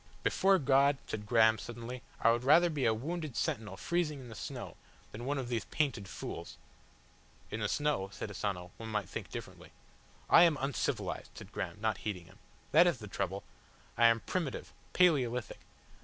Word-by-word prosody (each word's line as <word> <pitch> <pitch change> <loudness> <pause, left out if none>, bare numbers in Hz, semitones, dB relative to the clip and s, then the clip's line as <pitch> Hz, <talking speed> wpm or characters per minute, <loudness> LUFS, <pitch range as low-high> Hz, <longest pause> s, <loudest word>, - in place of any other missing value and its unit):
"Before 195 0 +4
God," 140 -1 +4
said 105 -1 -5
Graham, 110 -1 +5
suddenly, 120 +1 -7 0.2
"I 115 - +5
would 120 +1 0
rather 165 +6 +6
be 145 -5 -1
a - - +5
wounded 150 +4 -3
sentinel 105 -3 -2
freezing 170 -4 -1
in 125 -2 -10
the - - -8
snow - - -6 0.4
than 120 +3 -7
one 145 +2 0
of 130 -3 -3
these 120 -2 -2
painted 135 -10 -1
fools!" - - -7 0.9
"In 110 - -3
the 105 - 0
snow," 145 -10 0
said 105 0 -6
Asano, 90 -3 -3
"one 110 0 -7
might 105 -4 -1
think - - -6
differently." - - -8 0.6
"I - - +8
am 165 -4 +5
uncivilised," 135 0 -2
said - - -10
Graham, - - -4
not 110 -1 0
heeding 95 -5 -4
him. 95 +5 -18 0.3
"That 170 +3 +7
is 170 -6 +2
the 105 -3 -9
trouble. 100 0 -3 0.5
I 120 0 +6
am 115 -1 +3
primitive 170 -7 -3 0.2
Paleolithic. 130 -10 +2
120 Hz, 175 wpm, -33 LUFS, 110-145 Hz, 0.9 s, I